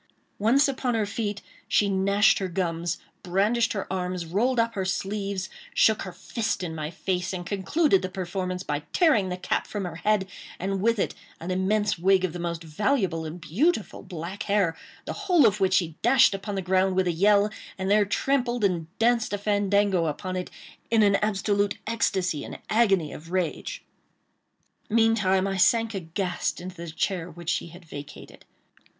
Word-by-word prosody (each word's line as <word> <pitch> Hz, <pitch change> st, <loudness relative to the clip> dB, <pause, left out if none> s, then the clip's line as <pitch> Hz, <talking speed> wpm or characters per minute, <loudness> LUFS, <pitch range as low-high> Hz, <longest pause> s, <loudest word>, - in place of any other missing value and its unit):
Once 250 Hz, +8 st, +4 dB
upon 260 Hz, -3 st, -1 dB
her 220 Hz, -2 st, +1 dB
feet, 205 Hz, -1 st, -3 dB, 0.2 s
she 205 Hz, -, +3 dB
gnashed 200 Hz, +2 st, +3 dB
her 190 Hz, -, -2 dB
gums, 170 Hz, -1 st, -2 dB, 0.2 s
brandished 205 Hz, +6 st, +1 dB
her 200 Hz, -3 st, -3 dB
arms, 180 Hz, -1 st, -2 dB
rolled 230 Hz, +9 st, +1 dB
up 230 Hz, 0 st, +1 dB
her 195 Hz, -4 st, -2 dB
sleeves, 195 Hz, +1 st, -2 dB, 0.3 s
shook 220 Hz, -1 st, +4 dB
her 185 Hz, -, -5 dB
fist 200 Hz, +3 st, -3 dB
in 165 Hz, -2 st, -4 dB
my 155 Hz, -1 st, -4 dB
face, 180 Hz, +2 st, -2 dB
and 175 Hz, -1 st, -5 dB
concluded 200 Hz, -, +2 dB
the 185 Hz, -, -3 dB
performance 185 Hz, 0 st, -3 dB
by 145 Hz, -4 st, -2 dB
tearing 230 Hz, -, +3 dB
the 180 Hz, -, -3 dB
cap 185 Hz, -, -1 dB
from 205 Hz, -3 st, -4 dB
her 165 Hz, -2 st, -6 dB
head, 210 Hz, +1 st, +1 dB, 0.3 s
and 195 Hz, +1 st, -2 dB
with 230 Hz, +2 st, +2 dB
it -, -, 0 dB, 0.3 s
an 170 Hz, +3 st, -4 dB
immense 195 Hz, +1 st, +1 dB
wig 190 Hz, +1 st, +4 dB
of 170 Hz, -, -4 dB
the 175 Hz, -, -6 dB
most 170 Hz, -1 st, -3 dB
valuable 175 Hz, -, 0 dB
and 160 Hz, +3 st, -6 dB
beautiful 220 Hz, -, 0 dB
black 175 Hz, +3 st, -7 dB
hair, 195 Hz, -5 st, +2 dB, 0.3 s
the -, -, -4 dB, 0.2 s
whole 340 Hz, -7 st, +6 dB
of 210 Hz, -1 st, +3 dB
which 190 Hz, -1 st, +3 dB
she 170 Hz, -3 st, +1 dB
dashed 245 Hz, -2 st, +5 dB
upon 200 Hz, +1 st, -4 dB
the 195 Hz, -, -2 dB
ground 185 Hz, +1 st, +2 dB
with 190 Hz, 0 st, +2 dB
a 175 Hz, -, +2 dB
yell, 205 Hz, +4 st, +3 dB, 0.3 s
and 190 Hz, +1 st, -1 dB
there 210 Hz, 0 st, +5 dB
trammpled 245 Hz, +2 st, 0 dB
and 175 Hz, -5 st, +1 dB
danced 230 Hz, -1 st, +2 dB
a -, -, +1 dB
fandango 200 Hz, -3 st, +2 dB
upon 185 Hz, +5 st, -3 dB
it, 180 Hz, -1 st, -3 dB, 0.4 s
in 225 Hz, -2 st, +4 dB
an 200 Hz, -1 st, +4 dB
absolute 205 Hz, -1 st, 0 dB
ecstasy 190 Hz, -8 st, 0 dB
and -, -, -7 dB
agony 195 Hz, -8 st, +3 dB
of 165 Hz, +3 st, -10 dB
rage. 185 Hz, -, -2 dB, 1.1 s
Meantime 215 Hz, -4 st, +3 dB
I 195 Hz, -1 st, -1 dB
sank 225 Hz, +4 st, +3 dB
aghast 180 Hz, 0 st, -2 dB
into 180 Hz, +1 st, -8 dB
the 170 Hz, 0 st, -6 dB
chair 175 Hz, +2 st, -2 dB
which 170 Hz, 0 st, -4 dB
she -, -, -2 dB
had 170 Hz, +1 st, -13 dB
vacated. 145 Hz, -2 st, -10 dB
195 Hz, 180 wpm, -26 LUFS, 180-210 Hz, 1.1 s, whole